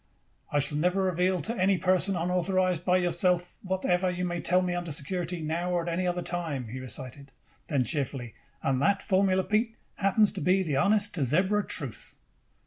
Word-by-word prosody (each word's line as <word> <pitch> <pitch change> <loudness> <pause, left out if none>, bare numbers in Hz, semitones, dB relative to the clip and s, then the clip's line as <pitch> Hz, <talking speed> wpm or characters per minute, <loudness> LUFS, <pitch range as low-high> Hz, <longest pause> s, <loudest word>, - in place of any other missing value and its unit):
"I - - +1
shall 145 +1 0
never 180 +4 +1
reveal 180 0 +1
to 225 +11 -3
any 190 -1 +2
person 185 +2 +2
unauthorized 180 0 0
by 180 0 +3
yourself 180 0 +1
whatever 185 -1 0
you 180 0 -2
may 175 -1 -3
tell 180 +4 +2
me 180 -1 -1
under 175 -2 -3
security, 170 +3 -2
now 170 +3 -2
or 175 -1 0
at - - -8
any 180 +2 -1
other 175 0 -1
time," 160 -10 -3
he 130 +3 -6
recited. 130 +2 -7 0.4
Then, 140 -4 +1
cheerfully: 135 -4 -3 0.3
"And 135 -1 +1
that 200 +5 +2
formula, 190 -1 +2
Pete, 220 +4 0 0.2
happens 200 +2 +3
to - - -6
be 190 +1 +3
the 155 -6 -2
honest 205 +7 +3
to 155 - 0
zebra 185 - +2
truth." 135 -7 -3
180 Hz, 185 wpm, -28 LUFS, 155-185 Hz, 0.4 s, by